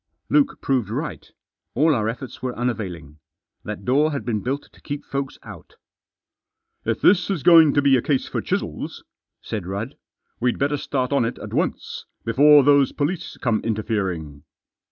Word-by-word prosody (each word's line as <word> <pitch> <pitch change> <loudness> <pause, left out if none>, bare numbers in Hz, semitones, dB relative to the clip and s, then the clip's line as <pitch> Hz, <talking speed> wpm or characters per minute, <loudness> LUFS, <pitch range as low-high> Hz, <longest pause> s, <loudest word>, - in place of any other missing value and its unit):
Luke 280 -2 +2
proved 125 -7 0
right. 145 +8 -5 0.4
All 155 +4 +4
our 110 -4 0
efforts 125 +2 -7
were 125 -1 -4
unavailing. 90 - -4 0.4
That 105 -2 -6
door 145 +5 +3
had 140 - -4
been 110 -4 -1
built 135 +5 -2
to - - -21
keep 145 -1 -6
folks 140 -1 -4
out - - -12 0.6
" - - -53
If - - -4
this 185 0 +4
is 180 -9 -2
going 165 -3 +7
to 145 - +3
be 140 -1 +5
a 125 - +2
case 135 0 0
for - - -3
chisels," - - -4 0.4
said 100 -5 -5
Rudd, 105 +8 -4 0.2
" - - -49
we'd 125 0 +1
better 145 +1 0
start 130 -1 -2
on 140 - +3
it 115 +2 -2
at - - -8
once, - - -2 0.2
before 145 +5 +6
those 140 -1 +4
police 155 +5 -3
come 115 -4 0
interfering." 95 -9 -3
130 Hz, 175 wpm, -23 LUFS, 110-145 Hz, 0.6 s, going